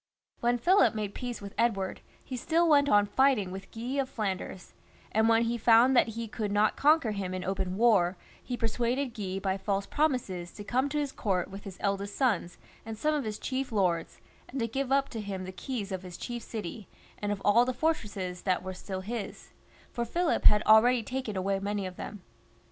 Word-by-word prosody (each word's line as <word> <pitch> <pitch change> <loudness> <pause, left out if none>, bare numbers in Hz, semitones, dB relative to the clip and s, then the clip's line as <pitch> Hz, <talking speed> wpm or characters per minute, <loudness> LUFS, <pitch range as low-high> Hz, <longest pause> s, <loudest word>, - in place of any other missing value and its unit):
When 240 +1 +2
Philip 355 - +4
made 210 -2 -3
peace 245 -4 -5
with 200 - -8
Edward, 200 -5 0 0.2
he 260 - -5
still 330 +7 +2
went 285 -2 +5
on 205 0 +5
fighting 215 -3 +2
with 195 +1 -8
Guy 245 +5 -3
of 260 - -5
Flanders, 190 -3 -4 0.4
and 220 +1 +3
when 225 0 +4
he 235 +1 -1
found 235 +4 +6
that 240 - +5
he 230 0 -3
could 210 -1 -3
not 210 +1 +3
conquer 295 -5 +4
him 190 -3 -3
in 185 - -4
open 190 -1 -2
war, 200 -6 +4 0.2
he 245 - -4
persuaded 240 +3 -1
Guy 195 -3 -4
by 195 0 -1
false 195 0 -1
promises 230 - -1
to 205 - -8
come 255 +6 0
to 300 - -2
his 290 -2 -1
court 190 -6 -1
with 195 +1 -9
his 195 -2 -8
eldest 200 0 -1
sons 205 -10 0 0.3
and 225 0 -7
some 305 +6 +1
of 290 -4 -1
his 215 -1 -3
chief 265 0 -3
lords, 180 -6 0 0.3
and 265 - -4
to 230 - 0
give 270 +3 -3
up 275 0 +3
to 225 - -5
him 195 -2 -5
the 185 - -6
keys 210 +1 -5
of 190 -1 -3
his 180 -2 -9
chief 240 -1 -5
city, 215 -2 -6 0.3
and 205 0 -2
of 205 - -2
all 220 +4 +6
the 255 - 0
fortresses 205 - -2
that 185 -2 0
were 190 - -5
still 190 +1 -6
his; 215 +1 -6 0.4
for 240 - -2
Philip 335 +8 0
had 210 0 +7
already 230 +2 +6
taken 255 -4 -4
away 195 +1 0
many 200 0 -2
of 185 -1 -7
them. 205 -4 -7
215 Hz, 210 wpm, -29 LUFS, 195-250 Hz, 0.4 s, had